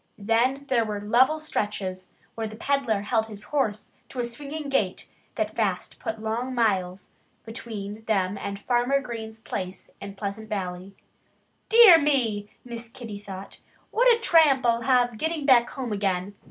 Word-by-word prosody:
Then 235 +6 +1
there 240 -3 +2
were 210 -2 -3
level 245 +9 +3
stretches 200 -10 -3 0.2
where 225 -1 -3
the 215 - -9
peddler 240 -4 0
held 220 0 0
his 210 -1 -9
horse 220 -8 -2 0.2
to 255 - -7
a 240 - 0
swinging 285 +5 -6
gait 215 -9 -1 0.3
that 215 0 -2
fast 195 -5 -2
put 220 -1 -4
long 235 +4 -3
miles 190 -5 0 0.3
between 220 -2 -7
them 195 -3 +1
and 200 0 -5
Farmer 245 +5 +1
Green's 225 -4 -7
place 190 -4 -6
in 200 0 -7
Pleasant 205 +2 -5
Valley. 190 -2 -5 0.7
"Dear 440 -8 +9
me!" 230 -8 +1 0.2
Miss 235 -1 -7
Kitty 225 -4 -8
thought. 195 -1 -9 0.3
"What - - +5
a 465 - +3
tramp 310 - +4
I'll 235 0 +3
have 245 -2 +2
getting 320 -2 -1
back 245 -4 +5
home 255 -4 -5
again!" 195 -1 -1
225 Hz, 155 wpm, -26 LUFS, 205-260 Hz, 0.7 s, Dear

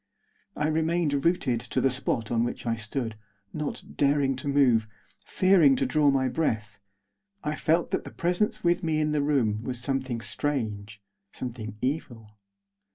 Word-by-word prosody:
I 150 - -1
remained 155 -2 +1
rooted 145 -9 +2
to - - -3
the 135 - +2
spot 120 -3 -2
on 115 -1 +2
which 120 - -4
I 115 -1 +1
stood, 115 +1 -4 0.4
not 150 -1 -4
daring 140 -1 +2
to 130 - -6
move, 130 -6 +3 0.4
fearing 180 -8 +4
to 135 - 0
draw 145 +3 +3
my 135 -1 +2
breath. 110 -9 -2 0.6
I 150 +1 -1
felt 165 +2 +1
that - - -1
the - - -8
presence 180 +6 0
with 175 +1 +2
me 160 -3 0
in 155 0 +1
the 150 -1 +1
room 125 -8 +1
was 125 0 -1
something 130 -1 -1
strange, 110 -6 -3 0.3
something 110 -4 -6
evil. 120 -7 -4
135 Hz, 160 wpm, -27 LUFS, 115-150 Hz, 0.6 s, fearing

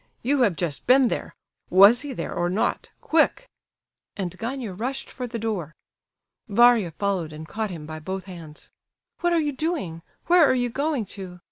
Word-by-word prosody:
You 275 +3 +2
have 205 -8 +3
just 160 -4 -4
been 255 0 +6
there. - - -4 0.3
Was 200 +6 +7
he 290 -1 -6
there 255 - -5
or 175 0 0
not, 190 +5 -1
quick?" 325 +10 +2 0.7
And 185 -4 -4
Gania 235 -3 -4
rushed 250 +8 -4
for 250 -1 -5
the 230 - -5
door. 205 -8 -3 0.7
Varia 235 -3 +5
followed 185 -2 -2
and 155 +1 -9
caught 215 +5 -3
him 165 -5 -7
by 155 0 -7
both 190 +4 -5
hands. 165 -5 -11 0.5
"What 350 -1 +1
are 340 - +3
you 300 -2 0
doing? 265 - -3 0.2
Where 350 -1 +6
are 270 - +4
you 245 -1 0
going 280 -3 -1
to? 180 -2 -8
220 Hz, 175 wpm, -24 LUFS, 180-265 Hz, 0.7 s, Was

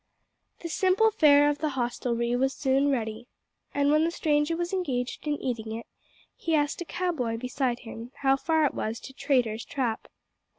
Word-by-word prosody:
The 335 - -4
simple 380 +6 +3
fare 290 -5 +6
of 290 0 0
the 310 - 0
hostelry 240 -1 -1
was 265 +2 +1
soon 275 +1 +2
ready; 230 -3 -2 0.4
and 285 0 +2
when 305 +1 +4
the 330 - +2
stranger 305 -1 +1
was 345 +2 -3
engaged 265 -7 -2
in 295 - +1
eating 225 -3 -3
it, 230 - -8 0.5
he 330 -1 0
asked 295 +2 0
a - - -3
cow 360 +2 -1
boy 240 -8 -2
beside 250 0 -2
him 230 0 -9
how 270 0 +5
far 315 +2 +2
it 285 - 0
was 220 +1 -3
to 265 - -11
Traitor's 240 -6 0
Trap. 245 -5 -2
270 Hz, 180 wpm, -27 LUFS, 240-310 Hz, 0.5 s, fare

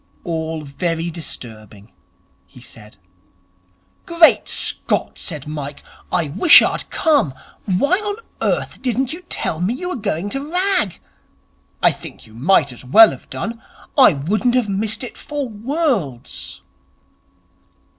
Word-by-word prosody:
'All 160 -2 -3
very 165 +4 -3
disturbing,' 110 - -7 0.6
he - - -16
said. 105 -1 -13 1.1
'Great 335 -1 +5
Scott,' - - -1
said 150 -5 -4
Mike, 145 -2 -6 0.3
'I 170 -4 0
wish 205 - +7
I'd - - -2
come. 290 - +2 0.3
Why 280 - +2
on 415 -1 -3 0.3
earth - - -1
didn't 260 +2 0
you 340 - -8
tell 160 - -2
me 200 +7 0
you 360 +7 -4
were - - -2
going 200 - -2
to 280 +5 -5
rag? 365 - +1 0.8
I - - +6
think - - -11
you 110 - -17
might 140 +3 +2
as 120 - -13
well 215 - +7
have - - -11
done. 230 0 -5 0.3
I 260 - +7
wouldn't 210 - 0
have 250 -4 +2
missed 210 +4 -1
it 245 - -8
for 290 -3 -4
worlds.' 225 - -3
195 Hz, 135 wpm, -19 LUFS, -, 1.1 s, wish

